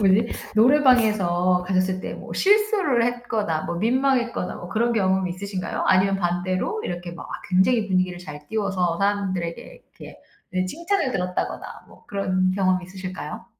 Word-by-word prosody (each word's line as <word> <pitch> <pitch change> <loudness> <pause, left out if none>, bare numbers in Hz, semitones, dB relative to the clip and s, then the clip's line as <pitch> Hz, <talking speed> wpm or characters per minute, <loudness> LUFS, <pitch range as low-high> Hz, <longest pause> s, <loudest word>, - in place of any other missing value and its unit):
뭐지 205 +3 +3 0.2
노래방에서 215 -8 +4
가셨을 185 0 +1
때 - - -5
뭐 - - -9
실수를 405 - +3
했거나 225 -9 -1
뭐 170 - -3
민망했거나 245 0 +1
뭐 175 - -9
그런 235 +4 +1
경험이 190 -3 +1
있으신가요? 190 0 -4
아니면 195 +1 +4
반대로 185 - -1
이렇게 175 0 -4
막 170 - -9
아 - - -7
굉장히 205 +4 +3
분위기를 185 -1 0
잘 150 -4 -10
띄워서 190 -5 0
사람들에게 190 -4 -1
이렇게 - - -14 0.3
네 185 0 0
칭찬을 340 - -1
들었다거나 180 -5 -2 0.2
뭐 - - -19
그런 185 -2 0
경험 185 -2 +1
있으실까요? 185 +1 -7
190 Hz, 370 characters per minute, -23 LUFS, 180-235 Hz, 0.3 s, 노래방에서